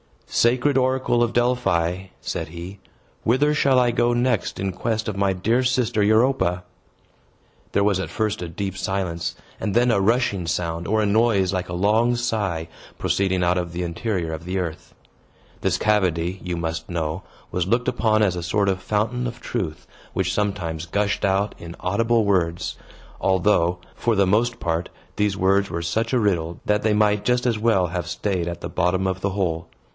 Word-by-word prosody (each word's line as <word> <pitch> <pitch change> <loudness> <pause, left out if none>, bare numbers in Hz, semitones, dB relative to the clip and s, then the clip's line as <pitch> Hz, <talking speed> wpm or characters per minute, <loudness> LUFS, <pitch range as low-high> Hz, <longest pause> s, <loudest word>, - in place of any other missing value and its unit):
"Sacred 125 +4 +2
oracle 130 -2 +2
of 120 -1 +1
Delphi," 95 -8 +1 0.2
said - - -3
he, 85 +4 -8 0.4
"whither 140 +6 +3
shall 135 -3 +3
I 125 -1 +4
go 120 0 +2
next 120 -3 0
in 95 0 -1
quest 110 +4 -2
of 105 -2 -3
my 100 -1 +2
dear 115 +7 +1
sister 120 -3 +1
Europa?" 110 -4 +2 1.1
There 100 - +3
was 100 -2 +2
at 95 - -3
first 110 -2 -1
a 90 - -3
deep 95 +3 -4
silence, 95 -3 -2 0.2
and 105 -2 -2
then 120 +1 +4
a 105 - +3
rushing 100 -4 +1
sound, 85 +1 -2
or 110 +1 +2
a - - +2
noise 100 -3 +3
like 90 -1 -2
a - - -4
long 110 +6 +2
sigh, 105 -9 -1 0.3
proceeding 95 -2 +1
out 90 +1 +2
of 85 -2 -3
the 90 +1 -2
interior 85 0 -2
of 80 +1 -7
the 90 +2 -2
earth. 85 -4 -5 0.6
This 95 -2 +1
cavity, 95 -4 +1
you 90 -1 -3
must 80 -1 -4
know, 85 0 -2 0.3
was 90 -1 -1
looked 120 +4 +2
upon 110 -2 +2
as 90 -4 +1
a - - -3
sort 100 +4 +1
of 95 -1 -1
fountain 115 +6 -1
of 120 0 -7
truth, 90 -10 -4 0.3
which - - 0
sometimes 90 -6 -2
gushed 100 +3 0
out 100 +1 +1
in 85 0 -8
audible 115 +4 +2
words; 90 -4 0 0.4
although, 90 -2 +2 0.2
for 115 -2 +1
the 100 -1 +4
most 120 +5 +1
part, 85 0 -1 0.3
these 105 -2 +1
words 100 +1 +2
were 85 - -3
such 110 +9 -1
a 125 - +4
riddle 85 -6 0
that 105 0 +2
they 110 -1 +3
might 105 -1 +2
just 125 0 +2
as 115 -3 +1
well 105 -5 +3
have 85 0 -4
staid 95 -5 -2
at 85 0 -5
the - - -4
bottom 90 +1 +1
of 95 0 -1
the 100 - 0
hole. 85 -4 -1
100 Hz, 185 wpm, -23 LUFS, 90-115 Hz, 1.1 s, I